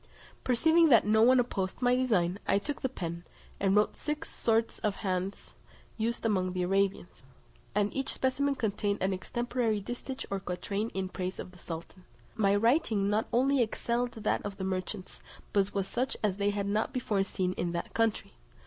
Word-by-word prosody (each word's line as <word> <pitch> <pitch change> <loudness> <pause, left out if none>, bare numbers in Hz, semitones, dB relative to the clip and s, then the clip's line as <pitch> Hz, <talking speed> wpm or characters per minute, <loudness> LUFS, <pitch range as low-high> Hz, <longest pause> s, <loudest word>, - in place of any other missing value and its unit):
Perceiving 320 +6 +4
that 230 -7 +6
no 220 +1 +4
one 255 +3 +6
opposed 195 -6 -1
my 245 0 +3
design, 200 -8 +1
I - - +4
took 285 +8 -4
the 260 - 0
pen, 170 -7 -5 0.4
and 195 0 +2
wrote 210 0 +3
six 300 +1 -4
sorts 225 0 +1
of 210 -2 0
hands 185 0 -3 0.4
used 230 +1 -2
among 185 -4 +1
the 180 -1 -1
Arabians, 195 -4 0 0.5
and 205 0 +1
each 270 0 -1
specimen 275 +2 0
contained 205 -4 -1
an 190 0 +2
extemporary 240 +2 -1
distich 245 +5 -5
or 195 - 0
quatrain 200 +4 -3
in 190 -1 -1
praise 185 0 -4
of - - -7
the 180 - -17
sultan. 170 +3 -8 0.3
My 200 -2 +3
writing 225 -3 +2
not 215 +2 +1
only 265 +2 +3
excelled 240 +2 -1
that 220 - -1
of 200 -1 -5
the 190 - -4
merchants, 185 +1 -4 0.3
but 200 -1 +2
was 195 -1 0
such 255 +5 -1
as 200 -3 +1
they 205 0 +2
had 205 -1 -1
not 210 +5 0
before 215 -6 +1
seen 185 -1 -1
in 175 -1 -2
that 170 - -4
country. 225 -2 0
205 Hz, 180 wpm, -30 LUFS, 190-240 Hz, 0.5 s, that